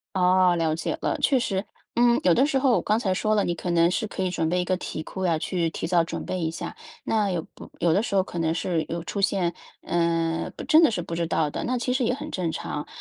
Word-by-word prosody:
哦， 185 -1 +4
了 160 -2 +1
解 165 - -2
了。 - - 0
确 270 - +4
实， 195 -4 -1 0.3
嗯， 240 0 +4
有 180 - +5
的 265 - +4
时 285 -2 +1
候 265 -1 +3
我 - - +3
刚 215 - +1
才 195 -5 0
说 215 +3 +1
了 205 - +2
你 175 - 0
可 175 +1 -5
能 170 +1 +4
是 220 +3 -1
可 190 - -4
以 185 - 0
准 165 -3 -1
备 180 +2 +1
一 - - -1
个 185 +1 0
题 155 -3 -5
库 190 -1 -4
呀， 165 -3 +2
去 170 0 -1
提 165 - -4
早 170 -2 +3
准 - - -5
备 185 - -3
一 160 -2 0
下。 165 - -6 0.3
那 210 -3 +1
有 170 -3 -2
不 - - -12
有 170 - +3
的 195 - +3
时 220 -3 -3
候 190 - +4
可 175 - -6
能 165 0 0
是 165 -3 -1
有 170 0 -4
出 200 - -4
现， 190 -3 +1 0.3
呃， 165 -1 0
不 - - -7
真 315 +2 +6
的 320 - +6
是 215 -6 -2
不 165 0 -5
知 170 0 -1
道 160 -2 +1
的， - - -4
那 250 +1 0
其 245 +1 -1
实 255 -1 +1
也 250 - +1
很 295 +4 -6
正 180 -3 -1
常。 150 0 -4
180 Hz, 300 characters per minute, -25 LUFS, 165-215 Hz, 0.3 s, 真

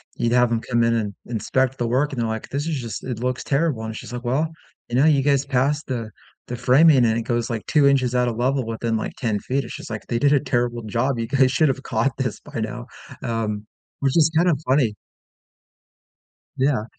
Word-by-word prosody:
you'd 115 - 0
have 125 0 +4
'em 115 -1 0
come 120 -1 +1
in 115 0 +3
and 105 -3 -1
inspect 130 +3 -1
the 120 - -1
work 135 +5 +1
and 120 - -2
they're 115 - 0
like, 110 0 -4
"This 145 +3 -3
is 155 -4 -1
just 115 -3 -6
it 125 -4 -4
looks 125 +1 -2
terrible," 140 -5 0
and 110 0 -5
she's 120 - -8
like, 125 0 -5
"Well, 135 +6 +1 0.4
and 120 - 0
now 135 - +5
you 145 -3 +4
guys 140 -1 +2
passed 140 +3 0
the 115 -4 -3 0.4
the 120 - -4
framing," 140 +5 +5
and 115 0 +2
it 115 - -2
goes 120 0 -1
like 115 -2 -4
2 150 -2 +3
inches 130 -3 +2
out 125 0 +2
of 115 - -5
level 130 +1 +1
within 115 0 -2
like 110 - -4
10 110 -4 -1
feet, 135 +5 -1
it's - - -7
just - - -9
like 110 -2 -5
they 115 - -1
did 140 +3 +3
a 145 - +5
terrible 120 -3 -1
job. 120 +4 -1
You 115 - -2
guys 130 0 +3
should 145 +4 +3
have 135 0 -2
caught 135 -3 0
this 130 -4 -2
by 115 - -6
now." 120 +2 -4 0.4
Um, 110 -3 -2 0.3
which 135 -1 0
is 160 0 +4
kind 175 +2 +4
of 155 - +2
funny 130 -5 +2 1.6
Yeah. 130 -4 +1
125 Hz, 235 wpm, -22 LUFS, 115-140 Hz, 1.6 s, now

